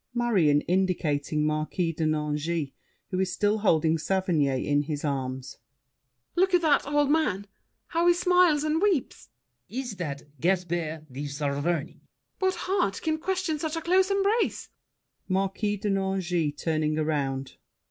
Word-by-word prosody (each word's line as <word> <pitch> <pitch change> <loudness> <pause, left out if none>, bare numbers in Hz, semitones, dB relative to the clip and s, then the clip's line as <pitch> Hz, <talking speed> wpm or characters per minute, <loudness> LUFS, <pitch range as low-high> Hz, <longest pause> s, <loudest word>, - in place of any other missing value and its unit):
MARION 185 -12 +3
(indicating 155 -5 0
Marquis 155 +3 -1
de 160 +1 -2
Nangis, 150 0 -1 0.4
who 185 - -1
is 190 -1 0
still 210 +3 +1
holding 160 -5 +2
Saverny 180 -5 +1 0.2
in 145 0 +2
his 150 0 -4
arms). 130 -2 -3 0.8
Look 375 +1 +3
at 350 - +2
that 295 -3 +3
old 290 0 +2
man, 210 -12 +1 0.4
how 340 0 +1
he 350 - +6
smiles 360 -4 +4
and 310 +2 +1
weeps! 375 - 0 0.4
LAFFEMAS. 240 +7 -4
Is - - -8
that 145 -5 -4 0.2
Gaspard 170 -2 -1
de 140 +3 -5
Saverny? 140 0 -2
MARION. 165 -3 -2 0.4
What 375 -1 +1
heart 365 - 0
Can 315 0 0
question 365 -3 -1
such 315 +1 -2
a 330 - -2
close 375 +2 +3
embrace? 400 +3 +1 0.6
MARQUIS 195 +2 -1
DE 210 - -1
NANGIS 185 -5 0
(turning 155 -1 0
around). 140 -4 -2
185 Hz, 145 wpm, -27 LUFS, -, 0.8 s, he